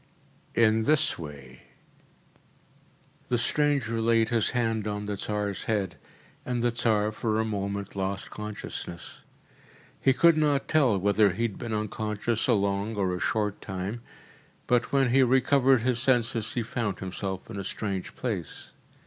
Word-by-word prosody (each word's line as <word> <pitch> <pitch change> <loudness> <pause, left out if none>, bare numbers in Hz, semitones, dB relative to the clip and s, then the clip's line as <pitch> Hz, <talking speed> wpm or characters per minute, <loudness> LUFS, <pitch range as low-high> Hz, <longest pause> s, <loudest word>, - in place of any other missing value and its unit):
“In 110 -1 +4
this 150 -8 +2
way.‚ÄĚ 70 -5 -9 1.7
The 120 - +2
stranger 130 -3 +1
laid 115 0 +3
his 115 -3 +2
hand 115 -3 0
on 105 0 -3
the 105 0 -2
Tsar’s 105 0 -3
head, 100 -7 -1 0.5
and 120 -1 -2
the 120 - +3
Tsar 110 -3 +1
for 110 0 -1
a 110 - +1
moment 100 -2 -3
lost 95 0 -3
consciousness. 105 -4 -6 0.8
He 135 - +5
could 165 +4 +5
not 145 -2 +2
tell 135 -10 +3
whether 100 +1 +3
he 115 - -2
had 115 -4 -2
been 120 -2 -5
unconscious 105 +1 -1
a 125 - +4
long 100 +1 0
or 95 -3 0
a 90 - -3
short 105 0 -1
time, 95 +5 -4 0.6
but 125 -1 +1
when 135 -2 +3
he 135 +2 +5
recovered 130 0 +4
his 125 0 +1
senses 120 -3 +1
he 120 - -1
found 110 -4 -2
himself 95 0 -5
in 100 - -5
a - - -3
strange 95 -1 -4
place. 100 - -4
110 Hz, 150 wpm, -27 LUFS, 100-120 Hz, 1.7 s, He